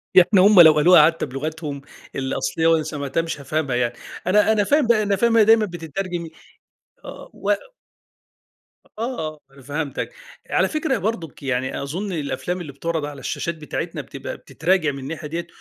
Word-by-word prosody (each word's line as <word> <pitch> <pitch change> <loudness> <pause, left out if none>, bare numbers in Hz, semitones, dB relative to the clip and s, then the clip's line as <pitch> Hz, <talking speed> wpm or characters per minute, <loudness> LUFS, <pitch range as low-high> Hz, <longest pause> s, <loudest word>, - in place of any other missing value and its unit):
يعني 180 -1 +7
هُم 195 0 +8
لو 160 -2 +9
قالوها 155 +1 +7
حتى 165 +1 0
بلُغتهم 145 +1 -5 0.3
الأصلية 135 +4 -1
وأنا 165 -1 +3
سمَعتها 145 +1 -2
مش 165 -3 -5
هافهمها 140 -2 -1
يعني 120 -1 0 0.3
أنا 210 +3 +4
أنا 210 -2 +3
فاهم 285 +1 +2
بقى 215 -3 +4
أنا 200 -1 +1
فاهم 235 +3 +2
إنها 225 -2 +6
دايمًا 220 0 +5
بتترجم 175 0 -5 0.8
آه - - -10
و - - -3 1.5
آه، 160 - -4
أنا 140 - -16
فهمتَك، 145 - -4 0.4
على - - +2
فكرة 310 -3 -1
أهي 230 - 0
برضُك 180 -8 -4
يعني، 130 0 -2
أظن 180 +9 -4
الأفلام 175 +4 -3
اللي 150 -5 -7
بتُعرض 160 +2 -3
على 145 -1 -8
الشاشات 170 +5 -3
بتاعتنا 150 -2 -5
بتبقى - - -8
بتتراجع 165 -1 0
من 135 - -7
الناحية 150 +3 -6
ديّة، 170 +2 -4
165 Hz, 165 wpm, -22 LUFS, 145-195 Hz, 1.5 s, لو